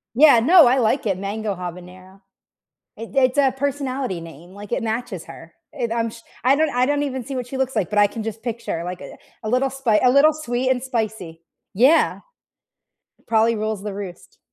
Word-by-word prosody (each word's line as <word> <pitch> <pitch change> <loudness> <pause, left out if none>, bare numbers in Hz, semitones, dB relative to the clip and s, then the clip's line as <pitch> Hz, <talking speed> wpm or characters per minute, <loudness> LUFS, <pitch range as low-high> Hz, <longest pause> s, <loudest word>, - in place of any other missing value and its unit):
Yeah, 280 -4 +7
no, 320 +3 +7
I 255 +2 +3
like 245 +2 +1
it, 195 -3 0
Mango 200 +1 -3
Habanero. 180 +2 -10 0.7
It 230 +4 -10
it's 255 0 +3
a 270 -2 +3
personality 270 -8 -3
name, 165 +2 -12
like, 205 +2 -11
it 250 - -1
matches 220 -5 -4
her. 165 0 -13 0.2
It, 240 -5 -3
um 230 0 -1
sh 230 - -12 0.3
I 270 +2 +5
don't 315 0 +2
I 250 -1 +1
don't 290 +1 0
even 260 -3 -4
see 275 -1 -6
what 250 -2 -3
she 265 - -6
looks 265 0 -1
like, 180 - 0
but 210 0 +1
I 205 - +6
can 220 +1 -7
just 225 0 -6
picture, 230 -8 -4
like, 180 +1 -6
uh, - - -10 0.3
a 215 - -3
little 260 +2 +1
spi 255 -5 +1
a 250 - +5
little 290 +4 +5
sweet 255 -4 -2
and 250 -1 0
spicy. 220 -10 -4 0.3
Yeah. 265 +11 +3 1.1
Probably 225 0 +3
rules 215 -2 -3
the 205 -2 -5
roost. 195 -3 -9
230 Hz, 200 wpm, -21 LUFS, 200-265 Hz, 1.1 s, Yeah